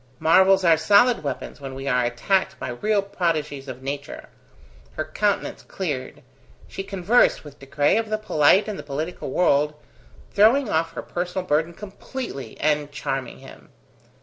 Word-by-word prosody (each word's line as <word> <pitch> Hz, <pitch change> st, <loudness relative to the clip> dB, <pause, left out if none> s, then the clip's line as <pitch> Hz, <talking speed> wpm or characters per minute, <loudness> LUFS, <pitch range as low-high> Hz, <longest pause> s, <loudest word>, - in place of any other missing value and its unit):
Marvels 190 Hz, +5 st, +4 dB
are 165 Hz, -2 st, +5 dB
solid 210 Hz, +8 st, +4 dB
weapons 140 Hz, 0 st, -6 dB
when 135 Hz, -1 st, -7 dB
we 135 Hz, +1 st, -6 dB
are 125 Hz, -2 st, +2 dB
attacked 125 Hz, +11 st, 0 dB
by -, -, -5 dB
real 200 Hz, -, 0 dB
prodigies 155 Hz, -7 st, -2 dB
of 130 Hz, 0 st, -8 dB
nature. 140 Hz, +1 st, -6 dB, 0.6 s
Her 155 Hz, -, -3 dB
countenance 200 Hz, +6 st, -1 dB
cleared. 145 Hz, -9 st, -5 dB, 0.4 s
She -, -, -6 dB
conversed 195 Hz, +4 st, +2 dB
with 145 Hz, -1 st, -13 dB
De 135 Hz, -, -13 dB
Craye 145 Hz, +7 st, +2 dB
of 225 Hz, -1 st, -2 dB
the 215 Hz, -, 0 dB
polite 195 Hz, -1 st, +3 dB
and 210 Hz, -2 st, -5 dB
the -, -, -4 dB
political 150 Hz, +4 st, -5 dB
world, 150 Hz, -1 st, +2 dB, 0.6 s
throwing 230 Hz, +6 st, +4 dB
off 165 Hz, -1 st, 0 dB
her -, -, -6 dB
personal 180 Hz, +1 st, -4 dB
burden 160 Hz, +2 st, 0 dB
completely, 200 Hz, -, -8 dB
and 150 Hz, -1 st, 0 dB
charming 135 Hz, -2 st, -4 dB
him. -, -, -14 dB
160 Hz, 155 wpm, -23 LUFS, 140-195 Hz, 0.6 s, are